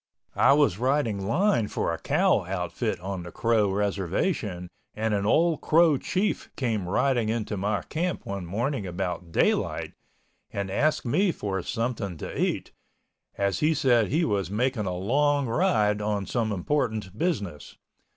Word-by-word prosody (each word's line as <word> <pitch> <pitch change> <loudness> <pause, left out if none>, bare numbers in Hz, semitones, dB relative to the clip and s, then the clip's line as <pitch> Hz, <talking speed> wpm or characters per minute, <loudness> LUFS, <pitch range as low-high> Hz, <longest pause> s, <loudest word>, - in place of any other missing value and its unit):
I - - +6
was 140 -10 +3
riding 120 -7 0
line 165 - +2
for - - -1
a - - -5
cow - - +2
outfit 90 +3 -2
on 95 0 -4
the 85 0 -8
Crow 110 -1 +2
Reservation 100 - -1 0.3
and 110 0 -1
an 100 0 0
old 165 +6 +3
Crow 160 -3 +4
Chief 195 +3 -1
came 110 -8 -1
riding 125 +1 +1
into 110 -2 -2
my 100 -2 -1
camp 175 +2 -3
one 100 -1 -4
morning 115 - -2
about 90 -1 -4
daylight, - - +1 0.6
and 100 -1 -4
asked 155 +8 +1
me 180 +10 +2
for 95 - -3
something 115 -5 -3
to - - -6
eat, - - -1 0.7
as 100 0 0
he 155 +1 +2
said 125 -7 +3
he 160 - +1
was 100 -3 -1
making 115 0 0
a 90 - -2
long 140 +8 +2
ride 110 - +2
on 105 -1 -1
some 115 -1 -1
important 110 -2 -1
business. 105 - -3
110 Hz, 150 wpm, -26 LUFS, 100-140 Hz, 0.7 s, I